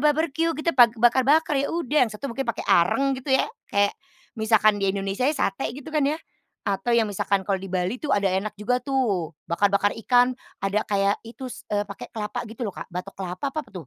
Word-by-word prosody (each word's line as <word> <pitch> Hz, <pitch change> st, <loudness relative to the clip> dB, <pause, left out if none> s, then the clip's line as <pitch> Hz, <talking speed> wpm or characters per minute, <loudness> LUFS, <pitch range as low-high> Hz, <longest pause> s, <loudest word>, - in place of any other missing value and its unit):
barbeque 315 Hz, +2 st, +2 dB
gitu, 310 Hz, +3 st, 0 dB
pak 240 Hz, -2 st, +6 dB
bakar-bakar 265 Hz, +7 st, +4 dB
ya 280 Hz, -, -1 dB
udah, 300 Hz, -6 st, +2 dB
yang -, -, -14 dB
satu 235 Hz, +5 st, -5 dB
mungkin 270 Hz, +1 st, -4 dB
pakai 235 Hz, -, -2 dB
arang 270 Hz, +11 st, +3 dB
gitu 270 Hz, -, -6 dB
ya. -, -, +2 dB, 0.2 s
Kayak, 200 Hz, 0 st, +2 dB, 0.5 s
misalkan 215 Hz, -1 st, +4 dB
di 195 Hz, -, +1 dB
Indonesia 195 Hz, +4 st, -2 dB
ya 305 Hz, -, +1 dB
sate 195 Hz, -2 st, -1 dB
gitu 280 Hz, +4 st, -9 dB
kan 300 Hz, -2 st, +2 dB
ya, 295 Hz, +3 st, +1 dB, 0.5 s
atau 205 Hz, +4 st, 0 dB
yang 230 Hz, -, +4 dB
misalkan 200 Hz, -1 st, 0 dB
kalau 195 Hz, -, +1 dB
di 195 Hz, -, -7 dB
Bali 185 Hz, +5 st, 0 dB
tuh 300 Hz, -, -4 dB
ada 200 Hz, -, +2 dB
enak 195 Hz, +3 st, -1 dB
juga 245 Hz, +5 st, 0 dB
tuh, 230 Hz, -, 0 dB, 0.2 s
bakar-bakar 200 Hz, +3 st, +2 dB
ikan 245 Hz, 0 st, +4 dB, 0.3 s
ada 200 Hz, +2 st, +1 dB
kayak 200 Hz, 0 st, +1 dB
itu 240 Hz, +4 st, -9 dB
s 245 Hz, -, -10 dB
eee, 205 Hz, 0 st, +1 dB
pakai -, -, -8 dB
kelapa 210 Hz, -2 st, -4 dB
gitu 225 Hz, +3 st, -8 dB
loh, 200 Hz, -, -4 dB
Kak, -, -, -7 dB
batok 180 Hz, +2 st, -5 dB
kelapa 185 Hz, +1 st, -5 dB
apa 310 Hz, -, -2 dB
apa -, -, -21 dB
tuh? 175 Hz, -7 st, -8 dB
220 Hz, 215 wpm, -24 LUFS, 200-270 Hz, 0.5 s, pak